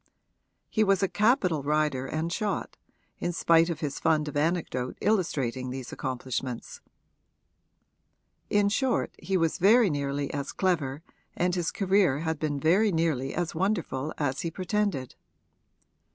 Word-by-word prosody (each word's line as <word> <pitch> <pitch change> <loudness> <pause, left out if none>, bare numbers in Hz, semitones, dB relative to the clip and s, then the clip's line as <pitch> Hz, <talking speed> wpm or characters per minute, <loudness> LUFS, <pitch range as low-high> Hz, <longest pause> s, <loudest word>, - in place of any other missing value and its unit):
He 220 - +1
was 195 -1 +2
a - - +4
capital 205 - +2
rider 150 -2 0
and 160 +4 -2
shot, 210 -1 -2 0.4
in 175 - -1
spite 165 0 +4
of 160 -2 -4
his 145 -3 -3
fund 155 -2 +2
of 145 - -6
anecdote 145 -5 -1
illustrating 140 - 0
these 130 -1 -6
accomplishments: 130 -2 -4 1.7
in 205 -1 +3
short 255 +4 0
he 190 -1 0
was 165 -2 0
very 210 +1 +5
nearly 140 -1 -2
as 140 -1 -4
clever 160 -6 0 0.3
and 180 +1 +1
his 175 -3 0
career 190 -7 +2
had 160 -2 -2
been 145 -2 -1
very 190 +8 +3
nearly 160 -6 0
as 175 -1 -2
wonderful 160 -6 -1
as 140 -3 -1
he 170 - -2
pretended. 185 - -2
160 Hz, 140 wpm, -28 LUFS, 140-190 Hz, 1.7 s, very